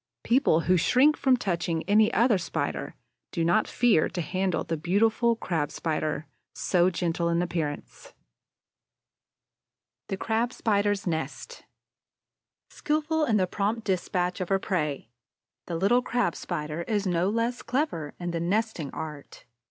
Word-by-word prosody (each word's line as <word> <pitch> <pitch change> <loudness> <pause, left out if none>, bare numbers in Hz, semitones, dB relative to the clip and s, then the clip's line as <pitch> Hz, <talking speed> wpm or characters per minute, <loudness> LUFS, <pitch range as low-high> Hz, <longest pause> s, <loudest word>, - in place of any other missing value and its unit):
People 235 - +3
who 180 +2 +3
shrink 265 - +4
from 260 -2 +3
touching 170 -6 -1
any 210 +4 +4
other 230 -4 +3
Spider 170 - -3 0.4
do 165 -3 -1
not 175 +6 +3
fear 235 -10 +3
to 175 - -3
handle 185 +3 -1
the 165 - -2
beautiful 220 +8 +2
Crab 165 -9 -2
Spider, 155 -1 -2 0.3
so 180 -1 +2
gentle 170 -1 -1
in 170 0 +1
appearance. 160 -4 -5 1.9
THE 195 - -2
CRAB 230 +4 -1
SPIDER'S 205 -2 0
NEST 175 - -4 1.1
Skillful 310 +1 0
in 225 -6 +2
the 185 - +3
prompt 210 +4 -2
despatch 180 -2 -1
of 180 - -3
her 195 - +3
prey, 150 - -2 0.6
the 170 - -3
little 200 +9 +3
Crab 245 -8 0
spider 155 -2 -4
is 210 -2 0
no 180 0 +1
less 230 +3 -1
clever 240 - -2
in 175 -1 -3
the 170 - -2
nesting 185 -3 -1
art. 150 -2 -8
185 Hz, 135 wpm, -27 LUFS, 170-225 Hz, 1.9 s, shrink